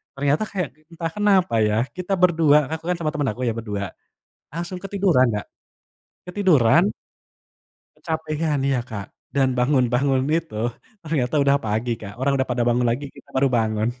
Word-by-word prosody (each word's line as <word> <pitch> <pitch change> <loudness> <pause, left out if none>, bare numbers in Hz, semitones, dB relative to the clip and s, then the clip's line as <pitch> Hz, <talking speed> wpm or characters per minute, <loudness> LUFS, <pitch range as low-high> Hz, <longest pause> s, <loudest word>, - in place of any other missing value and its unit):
ternyata 145 +6 +1
kayak 180 -7 -2 0.2
entah 165 -1 -4
kenapa 195 - +3
ya, 105 0 +2 0.2
kita 180 +2 -2
berdua, 165 -5 +5
kan 160 - -2
aku - - -18
kan 180 - -1
sama 155 -2 -1
temen 145 -3 0
aku 120 - -8
ya 115 - +1
berdua, 105 -3 -3 0.7
langsung 175 +3 -5
ketiduran 195 -9 +3
Kak. 105 - -3 0.8
Ketiduran 170 - +4 1.1
kecapean, 155 -2 -2
iya, 135 -2 +1
Kak, 105 -6 -6 0.3
dan 135 -2 +3
bangun-bangun 130 0 +2
itu, 165 -7 -1 0.5
ternyata 150 -5 -1
udah 140 0 +4
pagi, 110 +2 -1
Kak, 100 -1 -9
orang 140 +1 +2
udah 130 - 0
pada 120 -1 +1
bangun 120 +1 +2
lagi, 135 +5 -2
kita - - -17
baru 135 +1 +4
bangun. 110 -2 +1
140 Hz, 160 wpm, -23 LUFS, 120-165 Hz, 1.1 s, berdua